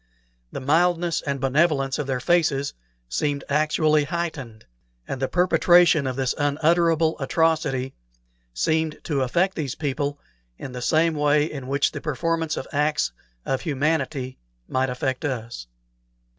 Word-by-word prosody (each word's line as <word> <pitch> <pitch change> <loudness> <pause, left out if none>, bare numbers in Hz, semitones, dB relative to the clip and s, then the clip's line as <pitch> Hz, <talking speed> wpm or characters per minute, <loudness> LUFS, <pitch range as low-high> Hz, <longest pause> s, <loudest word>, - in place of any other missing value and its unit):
The - - -5
mildness 170 +4 +2
and 140 -1 -3
benevolence 135 0 +1
of 145 - -3
their 130 -2 -1
faces 140 -2 +1 0.3
seemed 140 - -1
actually 155 0 +2
heightened, 145 -9 -5 0.4
and 135 - -5
the 135 - +1
perpetration 175 -3 +4
of 130 - -2
this 130 -1 0
unutterable 160 +2 +2
atrocity 145 -3 0 0.6
seemed 160 - 0
to 145 -4 -1
affect 175 +9 +1
these 145 -6 -3
people 145 -1 -2 0.4
in 135 - -7
the 125 0 -6
same 160 +5 +2
way 150 0 +2
in 140 -5 -7
which 140 +1 +1
the - - -6
performance 160 +2 -1
of - - -5
acts 150 +1 +1 0.3
of 135 - -1
humanity 145 -3 -1 0.3
might 130 0 0
affect 130 +3 -2
us. 115 - -4
145 Hz, 135 wpm, -24 LUFS, 135-160 Hz, 0.6 s, perpetration